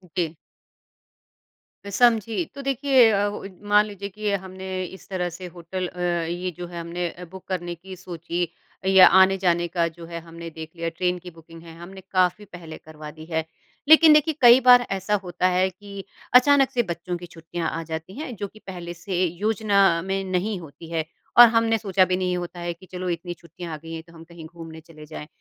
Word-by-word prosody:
जी। 175 -2 +1 1.6
मैं 200 - -7
समझी। 230 - +2
तो 280 - -6
देखिए 270 -3 +4
अ, 205 0 +1 0.4
मान 210 0 +5
लीजिए 200 -1 -7
कि 210 +1 -3
हमने 190 -1 -4
इस 190 +2 -12
तरह 180 -2 -2
से 175 +2 -9
होटल 180 +2 -4
अ, 180 - -12
ये 175 +1 -1
जो 175 0 -6
है 170 0 -7
हमने 170 +1 -3
अ, 180 +2 -10
बुक 190 -1 -11
करने 175 -2 -3
की 185 +3 -11
सोची 175 -1 -4 0.4
या 190 -1 +8
आने 190 +1 +5
जाने 175 -2 +1
का 170 -1 0
जो 165 +1 -10
है 170 0 -6
हमने 165 0 -9
देख 160 0 -9
लिया 165 0 -3
ट्रेन 180 +2 -1
की 180 0 -11
बुकिंग 165 0 -15
है 165 -1 -12
हमने 190 +3 -11
काफ़ी 185 +2 +1
पहले 175 -5 -10
करवा 155 -1 -11
दी 155 +1 -12
है 160 0 -1 0.4
लेकिन 315 0 +9
देखिए 305 +1 +3
कई 245 +1 +9
बार 245 -1 +7
ऐसा 195 +2 0
होता 180 0 0
है 185 +1 +2
कि 200 +1 -10 0.3
अचानक 270 +1 +6
से 240 - +1
बच्चों 175 -1 -4
की 175 - -9
छुट्टियाँ 165 0 -5
आ 165 - -4
जाती 160 +5 -7
हैं 270 -6 -6
जो 205 -1 -4
की 215 +2 -18
पहले 175 -2 -7
से 180 +1 -2
योजना 205 +4 -1 0.2
में 195 +2 -2
नहीं 190 +2 -1
होती 160 +1 -12
है 160 -1 -1 0.3
और 240 - +11
हमने 230 0 +2
सोचा 195 -3 +2
भी 185 0 0
नहीं 180 -1 -1
होता 175 0 -6
है 175 0 -3
की 170 +2 -17
चलो 180 0 -4
इतनी 175 +1 -4
छुट्टियाँ 170 0 -10
आ 155 - -5
गई 165 +2 -10
है 160 - -5
तो 165 +1 -20
हम 165 -1 -12
कहीं 165 -1 -12
घूमने 165 0 -10
चले 155 -1 -14
जाएँ 150 0 -9
180 Hz, 210 wpm, -24 LUFS, 170-200 Hz, 1.6 s, और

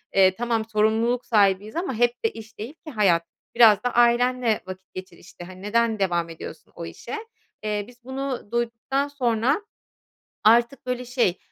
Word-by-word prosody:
eee, 190 -1 +5
tamam, 230 0 -1
sorumluluk 225 +3 +1
sahibiyiz 205 -1 +2
ama 340 -4 -2
hep 240 +1 +1
de 225 - +2
iş 225 0 -12
değil 230 +7 -6
ki 310 - -7
hayat. 195 -8 +3 0.3
Biraz 220 -3 +6
da 245 - -1
ailenle 240 -1 +3
vakit 185 0 -10
geçir 185 -1 -9
işte. - - -13
Hani, 185 +1 -11
neden 225 +1 +1
devam 175 -3 0
ediyorsun 165 - -10
o - - -6
işe? - - -7 0.5
Eee, 210 -1 -1
biz 245 -1 -18
bunu 265 -3 -5
duyduktan 235 +4 -1
sonra 255 - +1 0.8
artık 235 +5 +4
böyle 250 0 -2
şey, 240 -8 +1
230 Hz, 160 wpm, -24 LUFS, 205-245 Hz, 0.8 s, Biraz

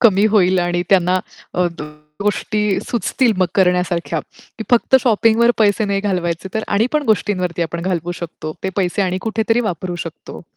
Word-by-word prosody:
कमी 205 -3 +5
होईल 185 -3 +3
आणि 175 0 0
त्यांना 185 -1 +4 0.4
अ, 180 0 +2 0.6
गोष्टी 210 0 0
सुचतील 240 +1 +1
मग 185 - +3
करण्यासारख्या. 180 -3 +1 0.4
की 220 - -4
फक्त 245 +2 +5
शॉपिंगवर 230 0 +4
पैसे 215 0 +3
नाही 200 -1 0
घालवायचे 180 -3 -2
तर 220 - -1
आणि 210 +3 +2
पण 305 -1 +1
गोष्टींवरती 185 -5 0
आपण 170 +1 -3
घालवू 175 -2 -2
शकतो. 165 -2 -7
ते - - -1
पैसे 190 +1 0
आणि 185 -1 -1
कुठेतरी 225 +1 0
वापरू 180 -4 -3
शकतो. 165 +1 -9
190 Hz, 160 wpm, -18 LUFS, 175-220 Hz, 0.6 s, कमी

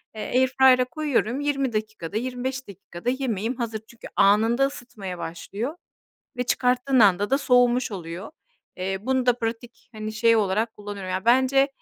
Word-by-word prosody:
eee, 215 - -6 0.2
Airfryer'a 260 -1 +5
koyuyorum. 270 -2 -1
20 275 -4 -1
dakikada, 215 -3 -4
25 255 +1 -4
dakikada 185 +2 -6
yemeğim 245 -3 -2
hazır. 225 -3 -3
Çünkü 235 - -12
anında 220 +6 +4
ısıtmaya 215 -9 -8
başlıyor 200 - -5 0.6
ve 250 - -1
çıkarttığın 250 +1 +2
anda 205 +1 +4
da 270 - +3
soğumuş 245 -2 +3
oluyor. 175 - -7 0.5
Eee, 190 +1 -2
bunu 260 0 0
da 245 0 +3
pratik, 230 0 -5
hani, 215 0 -5
şey 230 +1 +3
olarak 215 +2 0
kullanıyorum. 205 -2 -7
Yani, 185 +2 -2
bence 265 +3 +4
235 Hz, 145 wpm, -24 LUFS, 205-255 Hz, 0.6 s, Airfryer'a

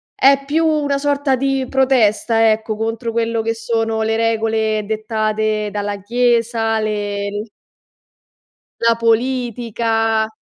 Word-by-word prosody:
è 275 +1 +4
più 320 +3 +1
una 295 -3 +1
sorta 285 -1 +1
di 270 0 -1
protesta, 230 -4 +3
ecco, 215 0 -2
contro 225 +1 -3
quello 230 0 -1
che 225 +1 -1
sono 225 -1 -1
le 220 0 0
regole 220 -1 0
dettate 215 0 -1
dalla 205 0 -3
chiesa, 230 0 +1
le 205 0 -3 1.3
La 230 0 +4
politica. 230 -2 0
225 Hz, 110 wpm, -18 LUFS, 220-245 Hz, 1.3 s, è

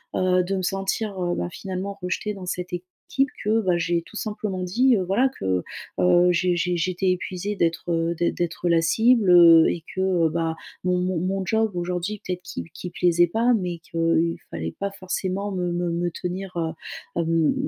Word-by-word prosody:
heu, 185 -1 +3
de 195 +2 -2
me 190 - -1
sentir, 195 +2 -2
heu, 175 0 0
ben, 85 0 -2
finalement, 195 - -5
rejetée 195 +3 -2
dans 190 -2 -8
cette 180 +1 -4
équipe 175 +1 -4 0.6
que, 220 +2 +2
bah, 180 -3 +1
j'ai 170 0 0
tout 220 - -11
simplement 210 -3 -3
dit, 240 +7 +3
heu, 185 - 0
voilà, 245 +9 +2
que, 95 -1 0 0.4
heu, 180 0 +5
j'ai 175 0 +1
j'ai 175 +1 0
j'étais 185 +2 0
épuisée 185 +3 -3
d'être, 170 -1 -1
heu, 165 0 +1
d'ê 170 - +1
d'être 175 0 -2
la 165 -1 +4
cible, 225 +3 +3
heu, 165 -2 +8
et 165 - -3
que, 190 - -1 0.2
heu, 160 - +3
bah, 165 0 -1 0.3
mon 180 0 +1
mon 180 -1 0
mon 190 +2 -1
job 220 0 +1
aujourd'hui 180 +4 -3
peut-être 180 -1 -3
qu'il - - -7
qu'il 180 - -7
plaisait 175 0 +3
pas, 230 +7 +2
mais 180 -3 -3
qu'il 165 0 0 0.2
fallait 80 0 -4
pas 200 0 -2
forcément 195 +1 -3
me 180 -2 -1
me 175 0 -1
me 170 +1 -1
tenir, 185 +2 -5
heu, 160 -1 -1 0.5
hem, 165 +2 +2
180 Hz, 195 wpm, -24 LUFS, 170-195 Hz, 0.6 s, heu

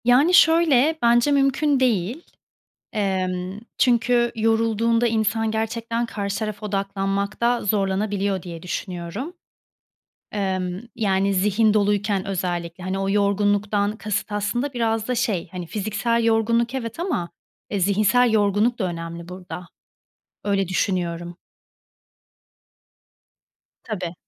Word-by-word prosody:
Yani, 265 +9 +5
şöyle: 320 -3 +5
Bence 240 +4 +4
mümkün 275 +1 +2
değil. 240 - 0 0.7
Emm, 185 -1 -2 0.2
çünkü 240 -1 +3
yorulduğunda 225 +1 +2
insan 225 0 +1
gerçekten 230 +1 -2
karşı 200 -3 -3
tarafa 215 -1 -4
odaklanmakta 200 +4 -1
zorlanabiliyor 200 -1 0
diye 170 -3 -8
düşünüyorum. 180 - -5 1.0
Emm, 185 -3 -2 0.2
yani, 195 -2 +1
zihin 210 +3 +3
doluyken 205 -1 +1
özellikle. 175 -2 -3
Hani, 190 +1 -2
o 195 0 -1
yorgunluktan 205 +1 +1
kasıt 210 -1 -3
aslında 210 +7 -1
biraz 225 -2 -1
da 250 - +1
şey, 210 -8 -1
hani, 180 -2 -5
fiziksel 215 +5 -1
yorgunluk, 230 +2 +2
evet, 235 +2 -4
ama, 310 - -2 0.4
e, 200 - -1
zihinsel 215 +5 +3
yorgunluk 210 +3 +2
da 205 - -1
önemli 170 -1 -5
burada. 180 -1 -8 0.8
Öyle 195 -2 +1
düşünüyorum. 175 -2 -2 2.5
Tabii. 185 -6 -4
210 Hz, 105 wpm, -23 LUFS, 190-230 Hz, 2.5 s, Yani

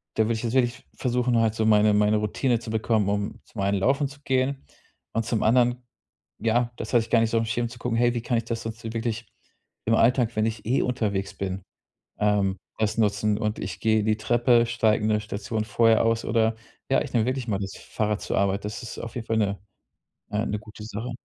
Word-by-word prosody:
da 110 - +3
würde 115 - +1
ich 110 - -5
jetzt 115 -1 -2
wirklich 125 -1 +1
versuchen, 125 -1 +1
halt 110 -1 +2
so 110 - 0
meine 105 -1 +5
meine 105 +1 +3
Routine 115 +3 0
zu 110 - -7
bekommen, 110 -2 +1
um 100 0 -2
zum 105 - -7
einen 100 +1 +1
Laufen 140 +7 +2
zu 140 +1 -14
gehen. 130 - 0 0.5
Und 115 0 0
zum 110 -1 0
anderen, 120 +2 +3 0.6
ja, 120 +1 +1
das 110 - -6
weiß 120 -2 +5
ich - - -18
gar 115 - +5
nicht 115 - +2
so 115 - +2
im 115 - 0
Schirm 115 +1 -1
zu 120 - -11
gucken: 115 -1 -1
„Hey, 120 0 +3
wie 120 - -1
kann 120 0 0
ich 115 - -2
das 115 0 -3
dazu 115 0 -6
wirklich 115 -1 -3 0.6
im 115 - +2
Alltag, 120 0 +3
wenn 110 0 +2
ich 110 -1 -3
eh 125 +5 +2
unterwegs 105 -6 -1
bin, 95 -1 -4 0.6
ähm, 100 -2 +2 0.2
das 110 0 0
nutzen." 105 -1 +2
Und 105 0 -2
ich 90 -1 -5
gehe 110 -1 +3
die 110 0 +2
Treppe, 120 +1 +3
steige 110 -2 +2
'ne 110 -1 +2
Station 105 +1 -3
vorher 115 +1 +3
aus 115 0 +1
oder 110 0 +2 0.3
ja, 135 - +3
ich 145 - -5
nehme 115 -3 +3
wirklich 130 -1 -2
mal 100 -3 0
das 100 -1 -5
Fahrrad 105 -1 -2
zur - - -2
Arbeit. 100 0 +1
Das 105 +4 -5
ist 115 - -7
auf 115 - -7
jeden 115 -2 -5
Fall 115 - +1
'ne 100 -2 0 0.7
eine 105 0 -1
gute 105 0 -12
Sache. 115 +3 -5
110 Hz, 225 wpm, -25 LUFS, 105-120 Hz, 0.7 s, meine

